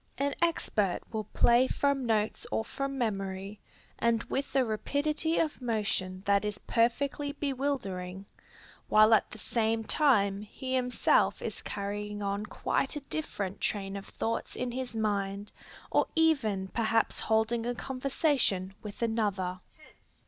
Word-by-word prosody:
An 280 +1 0
expert 215 - +1
will 215 -2 -3
play 240 +5 +4
from 280 -3 0
notes 215 -1 0
or 220 - 0
from 275 +3 -3
memory, 195 -3 -2 0.4
and 230 -1 +2
with 275 0 -3
a 265 -2 +4
rapidity 295 +8 0
of 305 -4 0
motion 200 -5 -1
that 200 0 +3
is 210 -1 -2
perfectly 280 +7 0
bewildering, 250 -11 -3 0.6
while 215 +1 +7
at 220 - +4
the - - -10
same 225 0 0
time 205 -8 +3
he 260 +5 -6
himself 250 -1 +2
is - - -5
carrying 205 +1 -4
on 200 +1 -2
quite 270 +6 -1
a 295 - -4
different 200 -11 -3
train 195 -1 -1
of 195 - -7
thoughts 230 0 -3
in 250 -1 -2
his 250 -1 -4
mind, 205 -2 -1 0.4
or - - +3
even 240 -13 +2
perhaps 225 0 +1
holding 225 +1 +1
a 245 - -1
conversation 260 - +1
with 210 +2 -6
another. 200 -5 0
225 Hz, 135 wpm, -30 LUFS, 200-265 Hz, 0.6 s, while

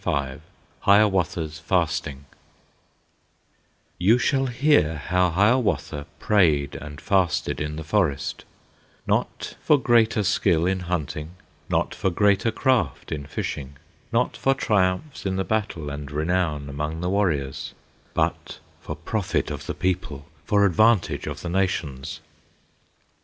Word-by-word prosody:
V 70 -4 -1 0.4
Hiawatha's 95 -6 +2
Fasting 80 -4 -1 1.7
You 105 +7 +5
shall 135 +2 +1
hear 125 - +3
how 90 +5 +1
Hiawatha 100 - +1
Prayed 80 -9 +2
and 75 -1 -8
fasted 95 -6 +1
in 75 0 -3
the 80 - -5
forest, 75 -5 0 0.6
Not - - -1
for 150 - +4
greater 115 -4 +3
skill 90 -4 +2
in 95 +1 +1
hunting, 85 -2 -4 0.3
Not - - 0
for 95 - 0
greater 100 +3 +2
craft 115 - 0
in 70 -2 -4
fishing, 70 -1 -5 0.3
Not 120 +1 +1
for 135 0 +1
triumphs 100 +3 0
in 95 - -1
the 95 - 0
battle, 95 -9 -2
And 70 -1 -6
renown 80 -1 0
among 75 +3 -4
the 90 - -1
warriors, 80 -10 -1 0.4
But - - -1 0.2
for 75 - -6
profit 90 +5 -2
of - - -6
the - - -3
people, 85 -6 -2 0.2
For 100 -1 +3
advantage 110 +2 +3
of - - -5
the 90 - -3
nations. 80 -7 -2
90 Hz, 125 wpm, -24 LUFS, 75-105 Hz, 1.7 s, You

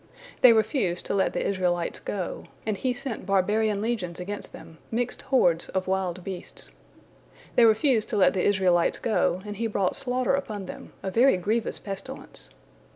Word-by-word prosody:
They 250 - +9
refused 215 -5 +1
to - - -2
let 195 -1 +1
the - - -1
Israelites 180 -3 0
go, 185 -4 -4 0.2
and 215 -2 0
He 255 +5 -1
sent 245 -5 -5
barbarian 205 +2 +2
legions 200 -8 -2
against 200 +3 -5
them, 160 - -12
mixed 245 +2 -2
hordes 175 -11 +2
of 190 0 -1
wild 185 -2 -1
beasts. 190 -1 -6 0.8
They 235 - +7
refused 220 +1 +3
to - - -1
let 195 - +5
the 185 - 0
Israelites 185 -4 +3
go, 190 -4 0
and 210 -1 -6
He 230 +1 0
brought 200 -4 0
slaughter 255 0 0
upon 215 -8 -2
them, - - -9
a 190 - -2
very 240 +1 +5
grievous 215 +5 -1
pestilence. 200 +7 -5
205 Hz, 165 wpm, -26 LUFS, 185-230 Hz, 0.8 s, They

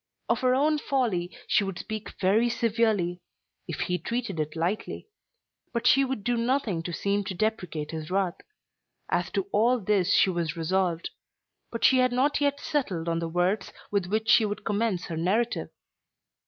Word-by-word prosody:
Of - - +2
her 255 0 +3
own 300 +3 +2
folly, 225 -13 0 0.2
she 205 - +3
would 195 -2 -4
speak 215 0 -6
very 215 +6 +3
severely, 220 -6 +1 0.5
if - - -4
he 180 -1 0
treated 225 -1 -3
it 155 +1 -2
lightly. 175 +6 -2 0.7
But 235 - -2
she 275 - +6
would 265 -6 -3
do 240 +2 +1
nothing 230 -7 0
to 175 - -5
seem 200 +4 0
to 190 - -4
deprecate 180 -7 -2
his 155 -1 -5
wrath. 185 -2 0 0.7
As - - 0
to 395 - +1
all 240 +4 +3
this 195 -3 +1
she 190 - +5
was 170 -1 -2
resolved. 170 0 0 0.6
But 230 - -5
she 260 - +6
had 255 0 +3
not 280 +4 +2
yet 285 0 +1
settled 195 - -2
on 165 0 0
the 165 -1 -3
words 180 +4 0 0.2
with 200 -3 0
which 220 +3 -1
she 220 +1 +6
would 210 -1 -3
commence 205 -3 0
her 165 - -5
narrative. 210 +8 0
205 Hz, 175 wpm, -27 LUFS, 175-235 Hz, 0.7 s, she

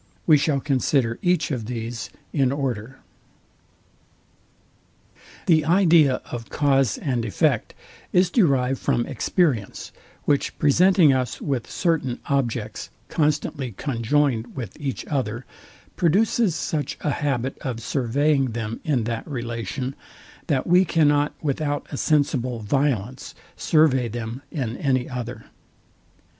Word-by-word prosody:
We 155 - +7
shall 145 -1 +2
consider 130 -3 0
each 180 -2 +1
of 115 -5 -3
these 115 -1 -5 0.2
in 135 -3 +2
order. 130 -3 -3 2.5
The 155 -3 +4
idea 165 -5 +4
of 115 -2 -6
cause 135 -5 +2
and 125 -5 -1
effect 105 -6 0 0.4
is 180 0 +3
derived 135 - +2
from 120 - 0
experience, 140 - -1 0.3
which 145 -1 0
presenting 170 +1 +5
us 130 -3 -1
with 135 -5 -3
certain 155 -8 0
objects 135 -5 -2 0.2
constantly 145 -4 -1
conjoined 125 +1 0
with 120 -8 -6
each 135 -2 -3
other, 125 -4 -2 0.5
produces 195 +2 +2
such 155 -3 -2
a 150 - 0
habit 135 -3 -1
of 125 -3 -4
surveying 135 +2 +1
them 115 -1 -4
in 135 -7 +1
that 115 0 -4
relation, 120 0 -4 0.5
that 140 -6 +1
we 180 +2 +5
cannot 150 -4 +2
without 145 0 -1
a 140 - -4
sensible 135 -6 +1
violence 125 +1 -1 0.2
survey 145 -6 +3
them 115 +2 -5
iii 125 -6 -3
any 130 -3 +1
other. 125 -1 -6
135 Hz, 115 wpm, -23 LUFS, 120-150 Hz, 2.5 s, We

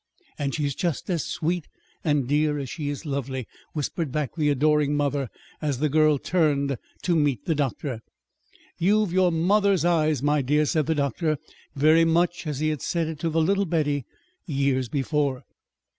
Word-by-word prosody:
"And 140 -2 -1
she's 145 -2 -1
just 170 +4 -2
as 165 -5 0
sweet 170 0 -2 0.4
and 145 -5 +1
dear 150 +1 +2
as 135 -3 -5
she 145 -3 -3
is 145 +3 -5
lovely," 135 -3 -3 0.3
whispered 150 0 -2
back 150 -2 -2
the 150 -3 +1
adoring 150 +1 +2
mother, 145 -3 0 0.3
as 145 -4 -1
the 150 +3 +1
girl 155 0 +4
turned 140 -4 +1 0.3
to 175 - +2
meet 145 -7 +1
the 165 - +1
doctor. 135 -4 -2 0.8
"You've 205 +1 +2
your 185 -1 +4
mother's 190 +2 +2
eyes, 155 -5 +2
my 145 0 +3
dear," 150 +3 +2
said 155 -1 0
the 160 - +1
doctor, 150 +2 0 0.4
very 155 +4 +5
much 170 +1 +1
as 150 -1 -3
he 155 - +2
had 150 -3 -3
said 165 -2 -1
it 160 -2 -6
to 165 - -1
the 160 0 +2
little 200 +4 +2
Betty 145 -6 0 0.4
years 135 -4 0
before. 140 -1 -1
150 Hz, 175 wpm, -25 LUFS, 140-165 Hz, 0.8 s, very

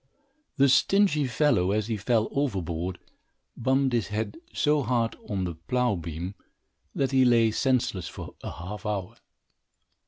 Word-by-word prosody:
The 140 0 +5
stingy 150 +2 +3
fellow, 125 -8 +2
as 105 +1 +1
he 115 0 -2
fell 110 +2 +1
overboard, 95 - -2 0.6
bumped 130 +1 +1
his 115 -4 +1
head 110 - -3
so 150 -1 +2
hard 120 -2 0
on 95 -2 -1
the 90 -2 -2
plough 120 +9 0
beam, 85 +2 -5 0.6
that 135 -1 0
he 130 -1 +4
lay 115 -3 +4
senseless 120 - 0
for - - -8
a - - -5
half 95 +3 -7
hour. 100 -3 -3
115 Hz, 145 wpm, -27 LUFS, 95-130 Hz, 0.6 s, The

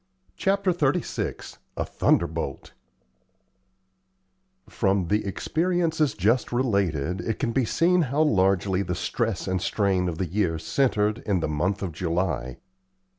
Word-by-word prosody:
CHAPTER 195 -1 +1
XXXVI 170 0 -2 0.2
A - - -1
THUNDERBOLT 80 -5 -1 2.0
From 95 -4 0
the 105 +1 +2
experiences 160 - 0
just 110 +6 +1
related, 95 - 0
it 110 +4 -2
can 125 -4 -1
be 130 +1 +1
seen 175 +9 +3
how 145 +1 +1
largely 95 - +2
the 90 -3 -2
stress 115 +2 -2
and 95 -1 -1
strain 95 -2 +1
of 80 - -5
the 95 - -1
year 85 -1 0
centred 105 - +1
in 100 -3 +2
the 80 - -1
month 90 +7 -1
of 90 - -3
July. 80 -7 -2
100 Hz, 125 wpm, -25 LUFS, 90-130 Hz, 2.0 s, seen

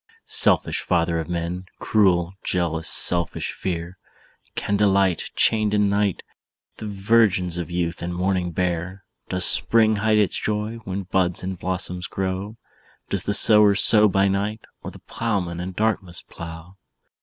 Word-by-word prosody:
"Selfish - - +2
father 85 -1 0
of 80 - -6
men! 90 +2 -4
Cruel, 90 -4 +1
jealous, 80 -3 -1
selfish 85 -2 -1
fear! 85 0 -5 0.6
Can 100 - -1
delight, 100 -3 +1
Chained 110 -2 +2
in 105 -1 +2
night, 100 -2 0 0.5
The 110 - -7
virgins 100 -4 +1
of 85 - -5
youth 85 -1 -3
and 85 - -4
morning 90 0 -1
bear? 90 +2 -3 0.3
"Does 90 -1 +4
spring 110 -2 +4
hide 110 +1 +2
its 105 -3 +1
joy, 105 +2 -3
When 95 +1 -4
buds 90 -1 -1
and 95 +1 -4
blossoms 90 0 -3
grow? 95 +3 -4 0.5
Does 100 - 0
the 100 - 0
sower 105 -2 +6
Sow 105 +1 +5
by 100 0 +2
night, 100 +3 -2 0.2
Or - - -7
the - - -13
plowman 95 -7 -3
in 90 +1 -5
darkness 100 -4 -1
plough? 85 +3 -11
95 Hz, 145 wpm, -22 LUFS, 90-105 Hz, 0.6 s, sower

